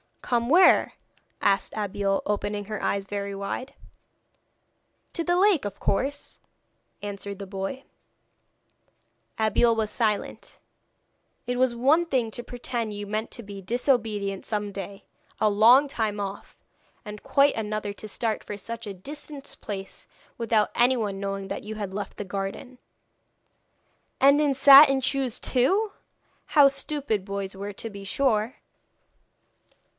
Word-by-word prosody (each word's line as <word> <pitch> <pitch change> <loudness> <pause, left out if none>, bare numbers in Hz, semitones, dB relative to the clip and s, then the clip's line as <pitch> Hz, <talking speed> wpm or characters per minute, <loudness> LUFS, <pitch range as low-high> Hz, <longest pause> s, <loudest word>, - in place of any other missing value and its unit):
'Come 235 -1 0
where?' 355 +4 +5 0.5
asked 195 0 +1
Abeille, 200 -1 -1
opening 205 0 -2
her 215 0 -5
eyes 200 -1 -1
very 200 0 -4
wide. 255 +7 -5 1.4
'To 335 - -3
the 350 - +2
lake, 380 - +3
of 200 -1 -5
course,' 275 +8 -2 0.6
answered 200 -1 -6
the 200 - -7
boy. 195 +7 -5 1.5
Abeille 225 +2 +3
was 220 -1 -1
silent. 215 -4 -2 0.9
It 245 +1 -2
was 255 -1 +2
one 290 +8 +3
thing 255 -8 0
to 240 - -6
pretend 240 -3 -4
you 205 0 -5
meant 215 +2 -3
to 235 - -6
be 200 -1 -9
disobedient 215 -3 0
some 210 -2 -2
day, 195 0 -7 0.4
a 215 - +3
long 235 +8 +6
time 215 -5 -2
off, 200 -1 -6 0.5
and 210 -1 -8
quite 280 0 +3
another 215 -1 -3
to 215 - -9
start 220 +1 -2
for 205 - -6
such 230 +2 -7
a 200 - -5
distant 285 +7 -9
place 195 -2 -7 0.3
without 225 -2 +1
anyone 235 -5 +1
knowing 195 -1 -4
that 195 - -4
you 220 +1 -6
had 205 -3 -5
left 205 +1 -5
the - - -4
garden. 195 +6 -6 1.4
'And 280 +2 +6
in 295 -2 +2
satin 275 0 +8
shoes, 265 -2 0
too! 385 - +1 0.5
How 285 -2 +6
stupid 275 -7 -2
boys 200 -1 -4
were 200 +1 -6
to 225 - -7
be 200 -1 -9
sure.' 230 +2 0
215 Hz, 135 wpm, -26 LUFS, 200-260 Hz, 1.5 s, satin